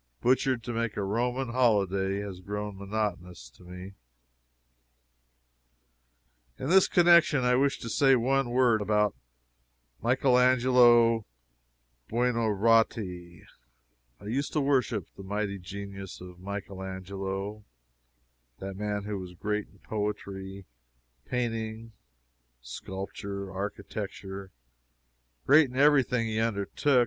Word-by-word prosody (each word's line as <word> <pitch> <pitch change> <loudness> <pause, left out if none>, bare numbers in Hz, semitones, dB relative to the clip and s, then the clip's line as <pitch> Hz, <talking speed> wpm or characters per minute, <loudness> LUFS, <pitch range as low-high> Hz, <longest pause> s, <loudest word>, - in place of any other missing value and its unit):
"Butchered 130 -1 +2
to 120 - -4
make 115 -1 -2
a 100 - -1
Roman 120 +5 -1
holyday" 100 -5 +1
has 100 -3 -7
grown 105 +2 -5
monotonous 95 - -4
to - - -22
me. 90 +2 -9 2.6
In 130 - -4
this 190 0 +6
connection 170 -5 +5
I 125 0 +3
wish 140 +2 +2
to 115 - -6
say 135 +3 +4
one 130 +1 +1
word 120 -3 +3
about 105 0 +2 0.9
Michael 125 +1 +3
Angelo 120 -3 +5 0.8
Buonarotti. 110 -6 +1 0.8
I - - -14
used 130 +7 -2
to 155 - +2
worship 130 - +1
the - - -10
mighty 100 0 -3
genius 95 +1 -8
of 90 -1 -11
Michael 100 0 -6
Angelo 95 +2 -5 0.9
that 95 0 -6
man 105 0 -3
who 105 -1 -4
was 90 -1 -9
great 105 +3 -2
in 100 - -23
poetry, 100 -2 -4 0.6
painting, 115 -2 -3 0.7
sculpture, 95 - -6
architecture 100 -1 -6 0.9
great 145 0 +6
in 125 - -8
every 145 0 +6
thing 125 -2 -1
he 110 -1 -2
undertook. 115 +5 +1
105 Hz, 110 wpm, -28 LUFS, 95-125 Hz, 2.6 s, this